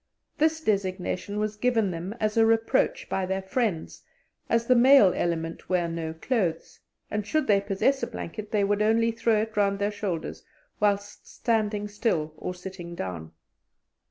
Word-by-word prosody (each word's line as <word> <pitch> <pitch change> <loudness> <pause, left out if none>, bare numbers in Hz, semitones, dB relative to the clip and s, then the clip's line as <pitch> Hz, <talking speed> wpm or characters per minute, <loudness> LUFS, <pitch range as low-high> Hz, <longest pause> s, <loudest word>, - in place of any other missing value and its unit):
This 320 +1 +2
designation 195 - -1
was 210 0 -2
given 225 -4 +1
them 175 +5 -5
as 215 0 0
a 225 - +5
reproach 225 0 +2
by 190 -1 -1
their 190 +1 -2
friends, 195 -4 -2 0.5
as 230 0 +2
the 255 - +5
male 250 -5 +7
element 165 -1 -2
wear 180 -2 +1
no 165 -1 -4
clothes; 170 -2 -2 0.3
and 210 0 -1
should 310 +10 0
they 200 -2 +3
possess 205 +7 +1
a - - -1
blanket, 210 +5 -7
they 210 -2 +1
would 205 +1 +1
only 225 +2 +3
throw 225 -1 +1
it 220 0 -8
round 200 -1 +2
their 205 +1 0
shoulders 195 -6 -4 0.4
whilst 205 0 -1
standing 210 -3 -1
still 205 -8 -1
or 180 - -5
sitting 180 -1 -8
down. 85 - -5
205 Hz, 160 wpm, -26 LUFS, 180-225 Hz, 0.5 s, male